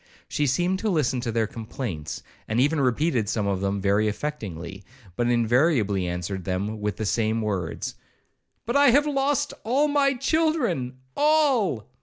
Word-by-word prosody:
She 150 Hz, -, 0 dB
seemed 175 Hz, +8 st, +1 dB
to 220 Hz, -, -1 dB
listen 145 Hz, -8 st, +1 dB
to 120 Hz, -2 st, -2 dB
their 115 Hz, 0 st, +1 dB
complaints, 110 Hz, -, -6 dB, 0.2 s
and 110 Hz, +2 st, 0 dB
even 145 Hz, +3 st, +2 dB
repeated 125 Hz, -3 st, +1 dB
some 105 Hz, -2 st, -1 dB
of 100 Hz, -2 st, -1 dB
them 100 Hz, 0 st, -1 dB
very 100 Hz, +2 st, +2 dB
affectingly, 100 Hz, -, -5 dB, 0.3 s
but 120 Hz, -, 0 dB
invariably 120 Hz, -, +2 dB
answered 90 Hz, +2 st, -4 dB
them 100 Hz, +4 st, -3 dB
with 105 Hz, -1 st, -2 dB
the 110 Hz, -, -2 dB
same 110 Hz, +2 st, +1 dB
words, 95 Hz, -6 st, -3 dB, 0.7 s
'But 235 Hz, +4 st, -2 dB
I 285 Hz, -1 st, +6 dB
have 285 Hz, +4 st, +4 dB
lost 285 Hz, 0 st, 0 dB
all 270 Hz, +6 st, +2 dB
my 280 Hz, -2 st, +2 dB
children—all!' 245 Hz, -, +1 dB
125 Hz, 150 wpm, -25 LUFS, -, 0.7 s, I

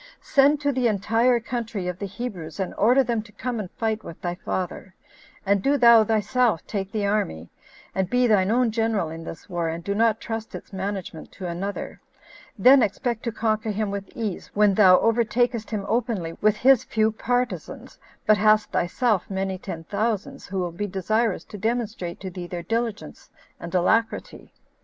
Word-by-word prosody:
Send 285 Hz, +1 st, +3 dB
to 285 Hz, -1 st, +1 dB
the 255 Hz, -2 st, +1 dB
entire 225 Hz, +4 st, +2 dB
country 230 Hz, -5 st, -4 dB
of 180 Hz, 0 st, -4 dB
the 200 Hz, -, -3 dB
Hebrews, 190 Hz, -6 st, -6 dB
and 190 Hz, -, -2 dB
order 250 Hz, +6 st, +4 dB
them 235 Hz, -3 st, -1 dB
to 215 Hz, 0 st, -16 dB
come 245 Hz, +2 st, -4 dB
and 195 Hz, -4 st, -5 dB
fight 220 Hz, -1 st, -2 dB
with 165 Hz, -, -9 dB
thy 175 Hz, -1 st, -3 dB
father; 185 Hz, +1 st, -5 dB, 0.5 s
and 200 Hz, 0 st, +2 dB
do 280 Hz, +6 st, +2 dB
thou 235 Hz, -3 st, +7 dB
thyself 220 Hz, -2 st, +1 dB
take 195 Hz, -2 st, -4 dB
the 210 Hz, -1 st, -1 dB
army, 200 Hz, -, -1 dB, 0.4 s
and 190 Hz, -1 st, -1 dB
be 250 Hz, +2 st, +3 dB
thine 200 Hz, -5 st, +3 dB
own 240 Hz, +1 st, +2 dB
general 225 Hz, -6 st, 0 dB
in 165 Hz, 0 st, -7 dB
this 160 Hz, -, -9 dB
war, 175 Hz, -3 st, -2 dB
and 165 Hz, +1 st, -5 dB
do 200 Hz, -, -1 dB
not 225 Hz, +1 st, +2 dB
trust 225 Hz, -1 st, -5 dB
its -, -, -10 dB
management 190 Hz, -4 st, -5 dB
to 190 Hz, -, -8 dB
another; 190 Hz, +4 st, -5 dB, 0.6 s
then 265 Hz, +1 st, +7 dB
expect 230 Hz, +2 st, -1 dB
to 235 Hz, -, 0 dB
conquer 220 Hz, -1 st, -1 dB
him 210 Hz, -1 st, -1 dB
with 200 Hz, -1 st, -5 dB
ease, 215 Hz, -6 st, -4 dB
when 205 Hz, -1 st, +4 dB
thou 185 Hz, -2 st, +7 dB
overtakest 235 Hz, 0 st, +1 dB
him 210 Hz, -3 st, -3 dB
openly 225 Hz, -8 st, -1 dB
with 215 Hz, 0 st, +3 dB
his 260 Hz, +1 st, +5 dB
few 220 Hz, 0 st, +1 dB
partisans, 245 Hz, +3 st, -3 dB, 0.3 s
but 215 Hz, -1 st, +5 dB
hast 215 Hz, 0 st, +3 dB
thyself 200 Hz, +3 st, 0 dB
many 190 Hz, -1 st, -2 dB
ten 170 Hz, -4 st, -6 dB
thousands, 220 Hz, +8 st, -2 dB
who 195 Hz, -, -5 dB
will 180 Hz, -2 st, -1 dB
be 205 Hz, +5 st, -4 dB
desirous 200 Hz, 0 st, 0 dB
to 210 Hz, -, -10 dB
demonstrate 220 Hz, -5 st, -2 dB
to 190 Hz, -1 st, -6 dB
thee 175 Hz, 0 st, -7 dB
their 175 Hz, -1 st, -5 dB
diligence 230 Hz, +1 st, -3 dB, 0.3 s
and 170 Hz, +1 st, -6 dB
alacrity. 220 Hz, +6 st, 0 dB
215 Hz, 180 wpm, -24 LUFS, 190-230 Hz, 0.6 s, thou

